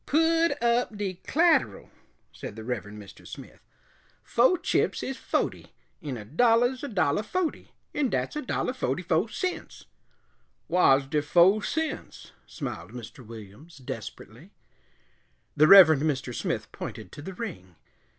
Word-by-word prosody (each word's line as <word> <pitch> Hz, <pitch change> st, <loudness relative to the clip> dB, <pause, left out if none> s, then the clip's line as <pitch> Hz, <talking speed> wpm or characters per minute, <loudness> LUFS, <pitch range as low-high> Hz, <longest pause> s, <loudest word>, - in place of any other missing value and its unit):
"Pud 325 Hz, 0 st, +2 dB
up 235 Hz, -2 st, +1 dB
de 190 Hz, -3 st, -4 dB
c'lateral," 310 Hz, -, +2 dB, 0.4 s
said -, -, -8 dB
the 110 Hz, -, -8 dB
Reverend 105 Hz, -3 st, -5 dB
Mr. 100 Hz, -2 st, -13 dB
Smith. -, -, -11 dB, 0.6 s
"Fo' 250 Hz, +10 st, +3 dB
chips -, -, 0 dB
is 265 Hz, -, -3 dB
fohty, -, -, -3 dB, 0.3 s
'n 140 Hz, -5 st, -5 dB
a 105 Hz, -, -9 dB
dollah's 240 Hz, -, +2 dB
a -, -, -3 dB
dollah 180 Hz, -, +1 dB
fohty, 345 Hz, -, -3 dB, 0.3 s
'n 290 Hz, -3 st, 0 dB
dat's -, -, -2 dB
a 300 Hz, -, -2 dB
dollah 255 Hz, -, -2 dB
fohty 180 Hz, -, -2 dB
fo' 175 Hz, +4 st, +1 dB
cents." 365 Hz, +11 st, -5 dB, 0.8 s
"Whar's 140 Hz, -6 st, +4 dB
de 150 Hz, +2 st, 0 dB
fo' 175 Hz, +7 st, +4 dB
cents?" 320 Hz, +8 st, -4 dB, 0.2 s
smiled 120 Hz, -6 st, -7 dB
Mr. 125 Hz, +2 st, -10 dB
Williams, 115 Hz, -, -12 dB
desperately. 130 Hz, -, -9 dB, 1.1 s
The 155 Hz, -, +5 dB
Reverend 160 Hz, -6 st, +9 dB
Mr. 145 Hz, -5 st, -1 dB
Smith -, -, -3 dB
pointed -, -, -8 dB
to -, -, -10 dB
the 190 Hz, +5 st, -8 dB
ring. 155 Hz, -, -7 dB
180 Hz, 140 wpm, -27 LUFS, -, 1.1 s, Reverend